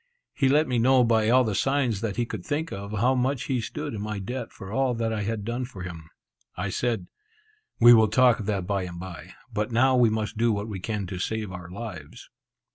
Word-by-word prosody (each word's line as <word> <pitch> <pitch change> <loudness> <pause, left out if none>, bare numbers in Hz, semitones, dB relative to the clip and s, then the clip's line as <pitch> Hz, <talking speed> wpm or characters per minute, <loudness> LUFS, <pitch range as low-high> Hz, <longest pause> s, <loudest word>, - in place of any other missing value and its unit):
He 135 -2 +2
let 150 +3 +3
me 125 -2 0
know 130 +2 +5
by 110 -2 +3
all 130 +2 +5
the 110 -3 -1
signs 130 -2 +1
that 110 -4 -2
he 120 - 0
could 110 -5 -6
think 155 - -2
of, 100 +1 -6
how 115 +5 +2
much 130 +1 0
he 130 -4 -1
stood 150 +6 -5
in 105 - -4
my 105 0 -3
debt 120 +5 -5
for 95 -2 -10
all 130 +1 +1
that 115 -1 -1
I 105 - -2
had 105 0 -3
done 120 +3 -2
for 110 -7 -8
him. 85 -3 -8 0.5
I 100 +3 -2
said, 115 -6 -1 0.7
"We 120 +1 +9
will 110 -2 +6
talk 125 +2 +4
of 105 - -5
that 100 -4 -1
bye 100 -1 -1
and 85 -1 -8
bye; 90 -1 -9 0.2
but 105 +3 -1
now 130 +3 +4
we 120 -2 +5
must 110 0 -3
do 115 0 +3
what 105 0 -2
we 100 -4 -5
can 105 +1 -3
to 90 0 -6
save 110 +1 -3
our 90 -1 -8
lives." 90 -7 -9
110 Hz, 235 wpm, -26 LUFS, 100-125 Hz, 0.7 s, We